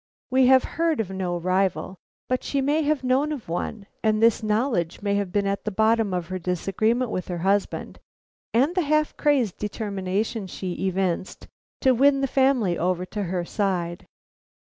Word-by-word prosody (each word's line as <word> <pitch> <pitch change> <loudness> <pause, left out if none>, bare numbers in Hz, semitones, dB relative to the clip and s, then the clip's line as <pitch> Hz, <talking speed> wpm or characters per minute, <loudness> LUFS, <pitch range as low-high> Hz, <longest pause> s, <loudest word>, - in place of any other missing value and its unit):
We 260 0 +5
have 260 0 +6
heard 330 -3 0
of 200 -4 -2
no 185 -2 -2
rival, 185 0 0 0.3
but 255 0 -1
she 280 - -1
may 290 +4 +2
have 300 -2 0
known 265 +4 +2
of 285 -7 -5
one, 200 +5 -4 0.2
and 215 -1 +2
this 230 0 +4
knowledge 215 - 0
may 200 -1 +1
have 200 -2 -1
been 200 0 +1
at 200 0 -1
the - - -1
bottom 220 0 +2
of 180 -2 -3
her 185 0 -3
disagreement 210 +7 0
with 185 - -3
her 180 - -3
husband 195 +4 -1 0.5
and 270 +9 +2
the 365 - +1
half 305 0 +1
crazy 270 - +2
determination 205 0 -2
she 185 0 -5
evinced 185 -1 -2 0.3
to 260 - +5
win 275 +3 +4
his 270 -1 -1
family 260 -10 +2
over 180 +1 0
to 205 +1 -4
her 175 0 -2
side. 180 -4 -2
210 Hz, 175 wpm, -24 LUFS, 185-260 Hz, 0.5 s, have